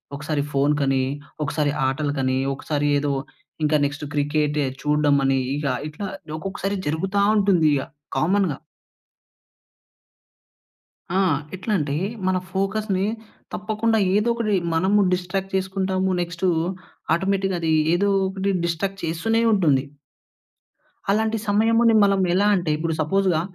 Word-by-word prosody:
ఒకసారి 145 Hz, +1 st, -2 dB
ఫోను 140 Hz, +1 st, +2 dB
కానీ, 135 Hz, -1 st, +2 dB, 0.4 s
ఒకసారి 145 Hz, 0 st, 0 dB, 0.2 s
ఆటల 145 Hz, +2 st, -1 dB
కానీ, 130 Hz, 0 st, +1 dB, 0.2 s
ఒకసారి 145 Hz, +1 st, -2 dB
ఏదో 145 Hz, 0 st, -1 dB, 0.5 s
ఇంక 150 Hz, 0 st, +1 dB
నెక్స్ట్ 145 Hz, +1 st, -4 dB
క్రికేటే 150 Hz, 0 st, 0 dB, 0.2 s
చూడ్డమనీ, 145 Hz, -2 st, +2 dB, 0.2 s
ఇగా 145 Hz, -1 st, -1 dB, 0.2 s
ఇట్లా 175 Hz, +7 st, -6 dB, 0.3 s
ఒక్కొక్కసారి 195 Hz, +2 st, -3 dB
జరుగుతా 190 Hz, +6 st, 0 dB
ఉంటుందిగ 175 Hz, -8 st, +3 dB, 0.4 s
కామన్‌గా. 185 Hz, -3 st, +1 dB, 2.6 s
ఆ! -, -, +4 dB, 0.4 s
ఎట్లంటే, 180 Hz, -7 st, -1 dB, 0.3 s
మన 185 Hz, 0 st, +2 dB
ఫోకస్‌ని 195 Hz, 0 st, -1 dB, 0.5 s
తప్పకుండా 220 Hz, +2 st, 0 dB, 0.2 s
ఏదొకటి 215 Hz, 0 st, +1 dB, 0.2 s
మనము 190 Hz, +5 st, +3 dB
డిస్ట్రాక్ట్ 190 Hz, +2 st, -3 dB
చేసుకుంటాము. 190 Hz, 0 st, 0 dB
నెక్స్టూ 175 Hz, +1 st, -1 dB, 0.7 s
ఆటోమేటిక్‌గా 195 Hz, 0 st, 0 dB
అది 160 Hz, -1 st, +1 dB, 0.2 s
ఏదో 200 Hz, +3 st, +2 dB, 0.2 s
ఒకటి 195 Hz, +1 st, -1 dB
డిస్ట్రాక్ట్ 190 Hz, +3 st, -3 dB
చేస్తూనే 220 Hz, +8 st, 0 dB
ఉంటుంది. 150 Hz, -10 st, +3 dB, 1.3 s
అలాంటి 220 Hz, +2 st, +1 dB
సమయముని 225 Hz, +3 st, +4 dB
మనం 200 Hz, -1 st, +3 dB
ఎలా 200 Hz, +3 st, +3 dB
అంటే, 175 Hz, -4 st, -1 dB
ఇప్పుడు 165 Hz, +1 st, -1 dB
సపోజుగా 180 Hz, +1 st, +2 dB
185 Hz, 105 wpm, -23 LUFS, 150-200 Hz, 2.6 s, ఆ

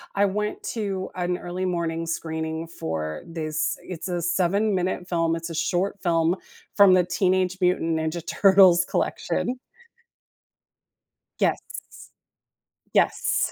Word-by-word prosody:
I 200 Hz, -, +4 dB
went 210 Hz, +2 st, -2 dB
to 195 Hz, -4 st, -3 dB
an 180 Hz, 0 st, -1 dB
early 180 Hz, +1 st, -5 dB
morning 165 Hz, -2 st, -2 dB
screening 160 Hz, 0 st, -3 dB
for 80 Hz, -, -4 dB
this 155 Hz, -1 st, -2 dB
it's 180 Hz, 0 st, -6 dB
a 175 Hz, -1 st, -2 dB
7 190 Hz, +5 st, +1 dB
minute 180 Hz, 0 st, -1 dB
film. 165 Hz, -2 st, +1 dB
It's 165 Hz, +1 st, -5 dB
a -, -, -5 dB
short 185 Hz, +5 st, -1 dB
film 165 Hz, -1 st, +2 dB, 0.4 s
from 200 Hz, -2 st, +7 dB
the 180 Hz, -, +4 dB
Teenage 185 Hz, 0 st, +1 dB
Mutant 165 Hz, -2 st, +2 dB
Ninja 160 Hz, +1 st, -3 dB
Turtles 190 Hz, -2 st, +6 dB
collection. 250 Hz, +6 st, -1 dB, 1.8 s
Yes. -, -, +2 dB, 1.3 s
Yes. -, -, +2 dB
175 Hz, 120 wpm, -25 LUFS, 165-185 Hz, 1.8 s, from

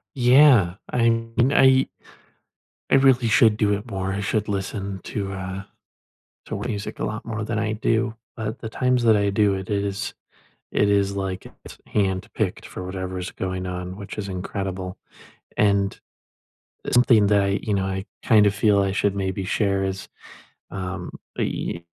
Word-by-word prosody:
Yeah, 125 Hz, -7 st, +6 dB, 0.2 s
I 115 Hz, -1 st, +3 dB
mean, 115 Hz, +3 st, +1 dB
I 130 Hz, 0 st, +5 dB, 1.0 s
I -, -, +5 dB
really 135 Hz, -3 st, +5 dB
should 110 Hz, 0 st, +5 dB
do 105 Hz, -1 st, +2 dB
it 100 Hz, +1 st, -4 dB
more. 95 Hz, 0 st, -2 dB
I 100 Hz, -, -2 dB
should 105 Hz, +2 st, -1 dB
listen 100 Hz, 0 st, -3 dB
to, 100 Hz, -2 st, -3 dB
uh, 95 Hz, 0 st, -5 dB, 0.8 s
to -, -, -4 dB
music 105 Hz, -3 st, -4 dB
a -, -, -2 dB
lot 110 Hz, +1 st, -4 dB
more 110 Hz, -2 st, -3 dB
than 110 Hz, 0 st, -2 dB
I 110 Hz, 0 st, -1 dB
do, 115 Hz, +1 st, 0 dB, 0.2 s
but 110 Hz, -1 st, -4 dB
the 110 Hz, -, -6 dB
times 125 Hz, +1 st, +1 dB
that 110 Hz, -2 st, +6 dB
I 100 Hz, -1 st, +2 dB
do 100 Hz, 0 st, +3 dB
it 95 Hz, -1 st, -5 dB
is 100 Hz, -1 st, -2 dB, 0.6 s
it 105 Hz, -, +2 dB
is, 100 Hz, -1 st, +2 dB
like 95 Hz, -2 st, -3 dB, 0.2 s
it's -, -, -11 dB
handpicked 95 Hz, -2 st, -1 dB
for 90 Hz, -, -7 dB
whatever 95 Hz, 0 st, -4 dB
is 90 Hz, -, -5 dB
going 95 Hz, 0 st, -4 dB
on, 90 Hz, 0 st, -5 dB
which 100 Hz, +1 st, -8 dB
is 105 Hz, -2 st, -4 dB
incredible, 95 Hz, 0 st, -4 dB, 0.6 s
and 100 Hz, -1 st, +2 dB, 0.9 s
something 120 Hz, -4 st, +5 dB
that 100 Hz, -1 st, +4 dB
I 100 Hz, -, +1 dB
you 105 Hz, -, -1 dB
know, 95 Hz, -1 st, 0 dB
I 95 Hz, +1 st, -3 dB, 0.2 s
kinda 105 Hz, -2 st, +5 dB
feel 105 Hz, 0 st, +3 dB
I 95 Hz, -1 st, 0 dB
should 100 Hz, 0 st, +1 dB
maybe 95 Hz, -1 st, -2 dB
share 100 Hz, 0 st, +1 dB
is 95 Hz, 0 st, -4 dB, 0.6 s
um, 95 Hz, -1 st, -5 dB, 0.3 s
eh, 85 Hz, -, -2 dB
100 Hz, 165 wpm, -23 LUFS, 95-110 Hz, 1.0 s, Yeah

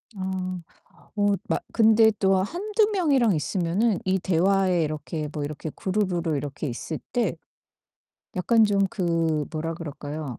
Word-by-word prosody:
아 185 Hz, -1 st, -3 dB, 0.6 s
어 205 Hz, -1 st, +3 dB
막 -, -, -1 dB
근데 220 Hz, -1 st, +5 dB
또 195 Hz, -1 st, +3 dB
1-2 410 Hz, -, +1 dB
명이랑 275 Hz, -, +3 dB
있으면은 185 Hz, +7 st, 0 dB
이 190 Hz, 0 st, +1 dB
대화에 185 Hz, 0 st, +2 dB
이렇게 155 Hz, 0 st, -4 dB
뭐 150 Hz, -, -3 dB
이렇게 150 Hz, +2 st, -5 dB
그룹으로 185 Hz, -5 st, -1 dB
이렇게 145 Hz, +2 st, -4 dB
있을 145 Hz, +5 st, -5 dB
때 230 Hz, -9 st, 0 dB, 1.0 s
약간 225 Hz, +5 st, +4 dB
좀 200 Hz, -2 st, +2 dB
그 165 Hz, -6 st, 0 dB
뭐라 165 Hz, +1 st, -3 dB
그럴까요? 150 Hz, -4 st, -6 dB
185 Hz, 255 characters per minute, -25 LUFS, 160-210 Hz, 1.0 s, 근데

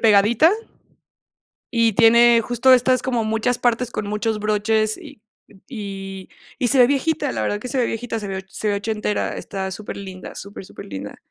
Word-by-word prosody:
pegadita, 225 Hz, -, +5 dB, 1.2 s
y 230 Hz, -3 st, +2 dB
tiene 235 Hz, +1 st, +6 dB
justo 245 Hz, +3 st, +3 dB
estas 255 Hz, +1 st, +3 dB
como 245 Hz, -3 st, -1 dB
muchas 225 Hz, +3 st, 0 dB
partes 240 Hz, 0 st, 0 dB
con 205 Hz, -, -4 dB
muchos 210 Hz, +1 st, -1 dB
broches 215 Hz, +1 st, +1 dB
y 210 Hz, -, -13 dB, 0.5 s
y 195 Hz, -5 st, -7 dB, 0.3 s
y 245 Hz, -, +1 dB
se 270 Hz, -, +2 dB
ve 245 Hz, -1 st, +7 dB
viejita, 285 Hz, -, 0 dB
la 110 Hz, -2 st, -3 dB
verdad 205 Hz, -, -1 dB
que 250 Hz, -, -7 dB
se 270 Hz, -, -2 dB
ve 245 Hz, -, +2 dB
viejita, 230 Hz, 0 st, -3 dB
se 205 Hz, -, -6 dB
ve 190 Hz, -1 st, -4 dB
o -, -, -7 dB
se 215 Hz, -, -5 dB
ve 205 Hz, -, +1 dB
ochentera, 210 Hz, 0 st, -2 dB
está 190 Hz, -1 st, -5 dB
superlinda, 190 Hz, -2 st, -8 dB
súper, 200 Hz, -1 st, -9 dB
superlinda. 95 Hz, -, -8 dB
220 Hz, 175 wpm, -21 LUFS, 200-240 Hz, 1.2 s, ve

